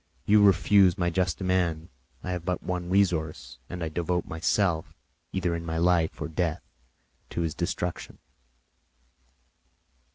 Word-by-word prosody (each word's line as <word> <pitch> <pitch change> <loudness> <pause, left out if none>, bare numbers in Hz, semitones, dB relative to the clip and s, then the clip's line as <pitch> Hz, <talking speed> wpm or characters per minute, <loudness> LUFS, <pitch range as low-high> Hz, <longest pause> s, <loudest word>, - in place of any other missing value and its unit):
You 105 0 +5
refuse 100 -2 +5
my 85 -1 0
just 90 -1 0
demand; 90 -3 0 0.3
I 90 - -3
have 90 -2 -3
but 90 0 -2
one 90 -1 -3
resource, 85 -9 0
and 90 -1 -5
I 80 - -2
devote 90 +2 -1
myself, 80 0 0 0.4
either 90 -3 -1
in 85 - -4
my 80 -1 -3
life 85 -1 +2
or - - -3
death, 80 +1 -2 0.7
to - - -3
his 80 -2 -1
destruction." 90 0 -3
90 Hz, 135 wpm, -27 LUFS, 85-90 Hz, 0.7 s, You